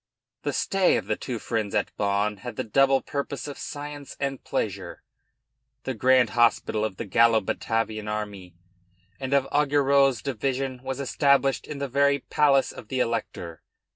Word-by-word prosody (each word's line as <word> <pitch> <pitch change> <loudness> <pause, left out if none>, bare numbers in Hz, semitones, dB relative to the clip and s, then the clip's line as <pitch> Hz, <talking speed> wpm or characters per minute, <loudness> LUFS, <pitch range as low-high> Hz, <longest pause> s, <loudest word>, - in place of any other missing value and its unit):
The - - -1
stay 195 -2 +2
of - - -4
the - - 0
two 125 -3 -5
friends 110 -2 -2
at - - -1
Bonn 100 +1 0
had 120 +5 -7
the - - -2
double 135 +4 +3
purpose 140 0 -4
of 145 - -7
science 145 -1 -7
and 135 -2 -3
pleasure. - - -3 0.8
The 130 - -2
grand 130 +2 +4
hospital 115 -2 +2
of 110 -4 -3
the 115 - -4
Gallo 115 +3 +4
Batavian 110 +1 -2
army 105 -4 -5 0.6
and 130 0 -4
of 140 -1 +3
Augereau's 140 -3 +3
division 130 0 -2
was 130 0 -4
established 140 0 +2
in 150 - -6
the 140 0 -3
very 140 +2 +3
palace 140 -1 +2
of 110 - -11
the 130 - -2
Elector. 100 -9 -3
130 Hz, 160 wpm, -26 LUFS, 110-140 Hz, 0.8 s, grand